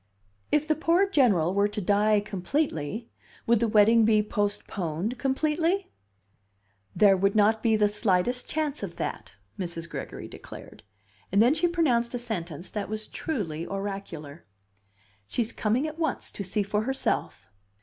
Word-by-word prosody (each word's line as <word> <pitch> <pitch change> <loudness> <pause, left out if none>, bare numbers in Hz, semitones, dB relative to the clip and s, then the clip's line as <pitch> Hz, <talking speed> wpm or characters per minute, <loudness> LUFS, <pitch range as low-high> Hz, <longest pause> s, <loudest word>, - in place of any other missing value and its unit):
"If 300 +1 +2
the 310 - +4
poor 335 +5 +2
General 210 - +3
were 200 +1 +3
to 210 - -5
die 205 +2 +3
completely, 205 - -2 0.3
would 235 -1 +4
the 235 - +2
wedding 220 +2 +5
be 215 -1 +4
postponed 205 0 -2
completely?" 315 +8 0 1.0
"There 200 -2 +6
would 195 +2 +1
not 215 +1 +4
be 225 -1 +3
the 210 -1 +4
slightest 210 +3 0
chance 300 -2 -2
of - - -5
that," - - -5 0.2
Mrs. 170 -2 -4
Gregory - - -7
declared. - - -11 0.5
And 200 - +3
then 240 +6 +6
she 330 +3 +2
pronounced 255 -9 +1
a - - 0
sentence 180 -8 -5
that 205 -2 -4
was 215 0 -4
truly 175 - -3
oracular: 195 -6 -6 0.8
"She's 230 - -2
coming 230 +7 0
at 310 +1 -6
once 315 -5 -2
to 200 - -5
see 200 +2 -1
for 210 +1 0
herself." 215 - -2
215 Hz, 150 wpm, -27 LUFS, 195-260 Hz, 1.0 s, There